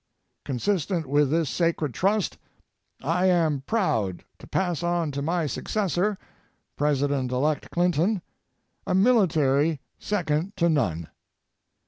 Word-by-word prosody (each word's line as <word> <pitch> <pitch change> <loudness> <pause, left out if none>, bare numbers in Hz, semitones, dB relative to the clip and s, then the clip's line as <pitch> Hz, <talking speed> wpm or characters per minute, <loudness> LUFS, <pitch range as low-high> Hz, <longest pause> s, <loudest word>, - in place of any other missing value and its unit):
Consistent 170 - -1
with 145 +1 +2
this 160 +1 +1
sacred 165 -4 0
trust, 195 - 0 0.6
I 175 +6 +2
am 160 -6 +2
proud 110 - 0 0.2
to - - -12
pass 175 -4 -1
on 175 -3 0
to 140 0 -3
my 165 +2 0
successor, 195 - -1 0.6
President 140 -3 0
elect 145 +4 0
Clinton, 175 +3 +1 0.6
a - - +1
military 165 - +3 0.2
second 180 -1 -1
to 170 0 +3
none. 90 - 0
165 Hz, 110 wpm, -25 LUFS, 145-180 Hz, 0.6 s, military